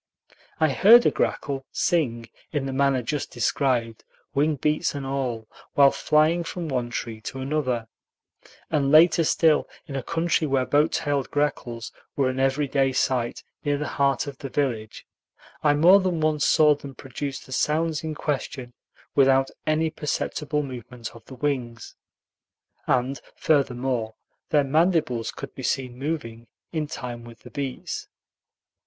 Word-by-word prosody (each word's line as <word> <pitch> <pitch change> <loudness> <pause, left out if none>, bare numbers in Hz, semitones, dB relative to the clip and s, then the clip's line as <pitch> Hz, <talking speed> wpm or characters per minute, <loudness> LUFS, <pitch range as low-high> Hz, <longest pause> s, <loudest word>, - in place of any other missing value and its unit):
I 155 - +4
heard 220 - +7
a - - +5
grackle 135 -2 -1
"sing" 120 -9 0 0.2
in 145 -3 -1
the 135 - -3
manner 135 -2 +2
just 145 +4 -3
described, 120 -1 0 0.3
wing 150 +2 +2
beats 150 +2 0
and 140 -1 -4
all, 130 -5 -3 0.3
while 140 -1 +7
flying 155 +3 +2
from 170 0 -5
one 125 -3 -1
tree 115 -2 -5
to 130 - -6
another; 130 -4 -1 0.8
and 145 -3 +2
later 165 +2 +6
still, 160 0 +3 0.2
in 140 - -7
a 135 - -1
country 165 +2 0
where 135 -2 +1
boat 145 +3 +3
tailed 145 -2 -1
grackles 120 -5 -2 0.2
were 135 -4 +2
an 130 0 -3
every 135 +2 +1
day 135 -1 +1
sight 125 -2 0 0.2
near 145 -1 +1
the 150 - -3
heart 140 -1 +2
of 140 -2 -8
the 135 - -6
village, 120 -7 -2 0.6
I 145 -1 +4
more 175 +7 +7
than 185 -3 -1
once 155 -1 +1
saw 155 -2 +6
them 140 -2 -9
produce 135 +1 -5
the - - -13
sounds 155 +3 0
in 155 -1 -4
question 130 -4 -3 0.4
without 135 -1 +4 0.2
any 155 +1 +2
perceptible 150 -1 -2
movement 125 -3 -8
of 115 - -14
the 130 - -11
wings, 125 -5 -3 0.9
and 125 +1 +1
furthermore, 125 -6 0 0.3
their 150 -2 +4
mandibles 150 -5 +1
could - - -8
be - - -8
seen 130 -1 -1
moving 125 -6 -4 0.2
in 155 -3 -2
time 120 -5 -6
with 115 -1 -13
the 125 - -13
beats. 135 0 -4
140 Hz, 150 wpm, -25 LUFS, 125-150 Hz, 0.9 s, heard